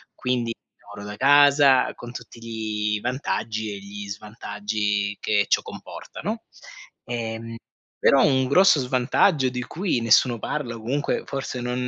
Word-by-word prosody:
quindi 120 -2 -1 0.3
lavoro 105 0 -10
da 105 - -8
casa, 140 -1 +5
con 120 - -9
tutti 115 0 -10
gli 110 -2 -2
vantaggi 110 -4 -2
e 100 - -7
gli 100 +1 -8
svantaggi 105 -1 -3
che 105 -1 +1
ciò - - +3
comporta, - - -10
no? 220 +5 -3 0.6
Ehm, 115 -1 -5 0.4
però 140 - +5
un 130 -2 +3
grosso 170 +3 +5
svantaggio 130 +3 +2
di 125 0 -4
cui 175 -1 -1
nessuno 115 +1 +4
parla, 120 -1 -3
o - - -9
comunque 140 +6 -1
forse 135 -2 -4
non 125 +1 -2
120 Hz, 140 wpm, -24 LUFS, 105-130 Hz, 0.6 s, casa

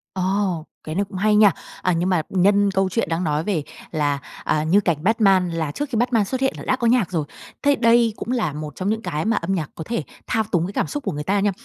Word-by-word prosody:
Ồ, 185 -3 0 0.2
cái 155 - -5
này 200 - +2
cũng 190 - -6
hay 210 +2 +3
nha. 210 -2 +7 0.3
À, 180 - +2
nhưng 175 +3 0
mà 180 -4 +2
nhân 200 +2 +3
câu 190 0 +1
chuyện 210 -2 -1
đang 165 +2 -1
nói 150 -1 0
về 170 -6 -1 0.3
là, 145 -3 0 0.2
à, 155 - +1
như 170 +6 +4
cảnh 170 -6 +1
Batman 195 -4 +3
là 160 -3 -2
trước 290 - -4
khi 245 - -3
Batman 230 -2 +2
xuất 260 +6 -3
hiện 265 - +2
là - - -8
đã - - +2
có 240 -2 0
nhạc 230 -7 +2
rồi. 160 -4 -1 0.4
Thế 285 0 +4
đây 230 -1 +4
cũng 235 - -5
là 235 - 0
một 150 -1 -6
trong 190 +2 -2
những 220 +1 -1
cái 155 -6 -3
mà 225 0 +2
âm 175 +3 -1
nhạc 160 -6 -2
có 160 - -6
thể 230 -6 -2 0.2
thao 225 -2 +1
túng 170 -2 +2
cái 195 - -6
cảm - - 0
xúc 290 -1 -4
của - - -1
người 150 0 -4
ta 200 +5 +1
nha. 205 +1 +2
195 Hz, 275 wpm, -22 LUFS, 165-220 Hz, 0.4 s, nha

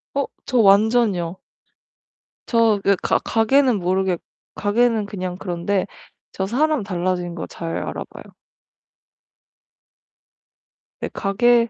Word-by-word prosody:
어 280 - 0 0.2
저 255 - +1
완전이요. 200 -4 +3 1.1
저 230 -3 +3
그 200 0 +4
가 - - +2
가게는 240 0 +2
모르겠 185 0 0 0.4
가게는 220 +1 +1
그냥 185 -3 -5
그런데 185 +1 -1 0.5
저 190 - -2
사람 290 +4 +1
달라진 180 -2 -2
거 170 - -5
잘 165 0 -5
알아 - - -4
봐요. - - -11 2.8
네 - - -4
가게 235 +4 +2
205 Hz, 195 characters per minute, -21 LUFS, 185-235 Hz, 2.8 s, 그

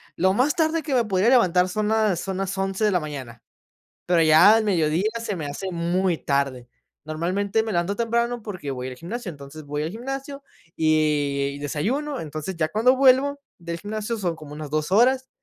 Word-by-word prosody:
Lo 190 +2 +2
más 260 +8 +2
tarde 320 0 +1
que 290 - -3
me 245 -2 +3
podría 200 0 +2
levantar 185 -8 +4
son 210 +3 -2
las 215 -5 +2
son 190 0 -4
las 195 0 -2
11:00 195 +2 -2
de 210 - +3
la 180 - +2
mañana, 135 -7 -7 0.7
pero 175 -2 +3
ya 160 +7 +7
al 225 - +3
mediodía 175 0 +1
se 230 -3 -3
me 160 -5 -5
hace 185 +7 -5
muy 175 +1 0
tarde. 135 -3 -1 0.4
Normalmente 185 +7 -1
me 220 - -3
levanto 175 +3 0
temprano 235 +1 -1
porque 185 -9 -6
voy 125 -1 -4
al 130 - -7
gimnasio. 190 - -6
Entonces 145 0 -11
voy 145 +1 -3
al 155 - -3
gimnasio 270 +5 -6 0.3
y 150 -3 +1
y - - -8
desayuno. 250 - -2
Entonces 155 +4 -5
ya 155 -1 0
cuando 230 +8 +3
vuelvo 275 +2 +4 0.2
del 170 -1 -5
gimnasio 215 +2 -4
son 175 -5 -2
como 150 -2 -11
unas 150 -1 -7
2 155 +3 -2
horas 255 +4 +3
185 Hz, 195 wpm, -24 LUFS, 155-225 Hz, 0.7 s, ya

